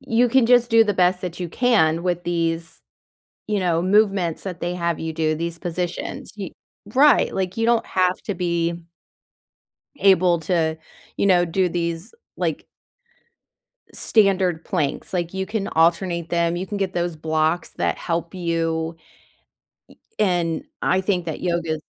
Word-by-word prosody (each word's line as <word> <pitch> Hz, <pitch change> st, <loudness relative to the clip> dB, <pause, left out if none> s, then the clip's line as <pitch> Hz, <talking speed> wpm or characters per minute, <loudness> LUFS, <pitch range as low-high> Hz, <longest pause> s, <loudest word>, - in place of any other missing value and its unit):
you 240 Hz, +2 st, +2 dB
can 250 Hz, 0 st, +4 dB
just 245 Hz, 0 st, +4 dB
do 225 Hz, 0 st, +6 dB
the 205 Hz, -2 st, 0 dB
best 180 Hz, 0 st, +2 dB
that 180 Hz, -1 st, -6 dB
you 175 Hz, -, -3 dB
can 170 Hz, -8 st, +2 dB
with 175 Hz, -1 st, -1 dB
these, 165 Hz, -1 st, -2 dB, 0.7 s
you 210 Hz, -1 st, 0 dB
know, 170 Hz, -3 st, +1 dB
movements 195 Hz, -3 st, +2 dB
that 180 Hz, -3 st, -6 dB
they 175 Hz, +1 st, -3 dB
have 170 Hz, -2 st, -1 dB
you 160 Hz, 0 st, -4 dB
do, 155 Hz, 0 st, 0 dB
these 170 Hz, +1 st, -4 dB
positions, 175 Hz, 0 st, -4 dB
y 195 Hz, -4 st, -5 dB, 0.4 s
Right. 290 Hz, +3 st, +5 dB
Like, 190 Hz, 0 st, -2 dB
you 225 Hz, -, +1 dB
don't 235 Hz, -1 st, +2 dB
have 185 Hz, -1 st, +1 dB
to 205 Hz, -, -3 dB
be 170 Hz, -1 st, -1 dB, 1.2 s
able 180 Hz, -3 st, +4 dB
to, 160 Hz, -1 st, 0 dB, 0.4 s
you -, -, +1 dB
know, 180 Hz, -2 st, +4 dB
do 180 Hz, +2 st, +1 dB
these, 170 Hz, +3 st, -3 dB, 0.2 s
like -, -, -2 dB, 1.3 s
standard 190 Hz, -6 st, +2 dB
planks. 155 Hz, -5 st, -2 dB
Like, 175 Hz, -1 st, -2 dB
you 190 Hz, 0 st, -1 dB
can 210 Hz, -1 st, -3 dB
alternate 170 Hz, +1 st, +1 dB
them, 170 Hz, 0 st, +1 dB
you 185 Hz, -, -3 dB
can 205 Hz, +1 st, -4 dB
get 190 Hz, -2 st, -2 dB
those 175 Hz, -1 st, -1 dB
blocks 160 Hz, +2 st, 0 dB
that -, -, -2 dB
help 170 Hz, 0 st, -3 dB
you. 165 Hz, -2 st, -2 dB
Y 160 Hz, -, -30 dB, 1.2 s
and 175 Hz, -5 st, +1 dB, 0.2 s
I 190 Hz, -, +2 dB
think 185 Hz, -3 st, -1 dB
that 160 Hz, -, -5 dB
yoga 170 Hz, -3 st, -1 dB
175 Hz, 155 wpm, -22 LUFS, 165-190 Hz, 1.3 s, do